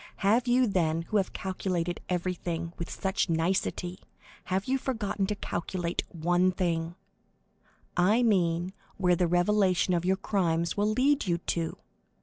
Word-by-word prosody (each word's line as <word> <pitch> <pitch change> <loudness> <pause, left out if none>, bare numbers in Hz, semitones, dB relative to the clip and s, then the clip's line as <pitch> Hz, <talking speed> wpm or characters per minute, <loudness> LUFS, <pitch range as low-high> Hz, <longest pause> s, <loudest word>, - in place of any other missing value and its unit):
Have 235 +5 +3
you, 250 +1 +4
then, 165 -6 +1
who 215 - -1
have 195 - 0
calculated 180 -2 -2
everything 175 -2 -2
with 170 - -4
such 190 -1 -1
nicety, 175 +2 -1 0.5
have 190 +2 -1
you 265 +1 +1
forgotten 210 -6 -2
to 210 - -1
calculate 175 -2 -3
one 175 +2 +2
thing—I 175 +4 -3
mean 180 -4 +2 0.2
where 180 -2 +3
the 175 0 +1
revelation 185 +1 +2
of 170 -1 +1
your 190 +1 +2
crimes 170 -4 0
will 210 +1 +1
lead 265 +1 +2
you 170 -1 +2
to? 165 -1 -3
185 Hz, 135 wpm, -29 LUFS, 170-200 Hz, 0.5 s, you